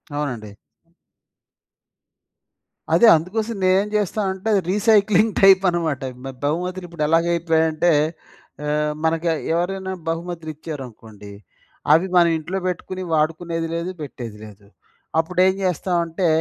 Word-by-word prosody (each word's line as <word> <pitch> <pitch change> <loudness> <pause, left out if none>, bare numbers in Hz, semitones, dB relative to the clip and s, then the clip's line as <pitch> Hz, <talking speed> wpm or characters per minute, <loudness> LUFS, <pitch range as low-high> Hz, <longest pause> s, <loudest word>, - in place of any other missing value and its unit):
అవునండి. 120 -8 -4 2.4
అదే, 235 - +6
అందు 165 +2 +1
కోసం 225 +1 -1
నే‌నేం 190 +2 +3
జేస్తానంటే, 200 -1 -1
అది 200 - +3
రీసైక్లింగ్ 210 0 +3
టైప్ 195 -1 +6
అనమాట. 165 -5 -1 0.2
మ - - -4 0.2
బహుమతులు 180 +5 -2
ఇప్పుడు 170 -3 -4
ఎలాగైపోయాయంటే 165 0 +2 0.8
ఆహ్, 150 0 0
మనకి 165 +1 0 0.3
ఎవరైనా 190 +2 -2 0.2
బహుమతులు 165 -1 -4
ఇచ్చారనుకోండి 115 -9 -9 0.6
అవి 165 +4 +4
మనం 170 -1 +6
ఇంట్లో 165 +5 -4
బెట్టుకుని, 185 +1 -4
వాడుకునేది 165 +2 -1
లేదు 170 +2 -3
పెట్టేది 120 -7 -7
లేదు. 105 -1 -13 0.5
అప్పుడేం 180 +3 +2
జేస్తామంటే, 175 -1 0
170 Hz, 105 wpm, -21 LUFS, 155-185 Hz, 2.4 s, అదే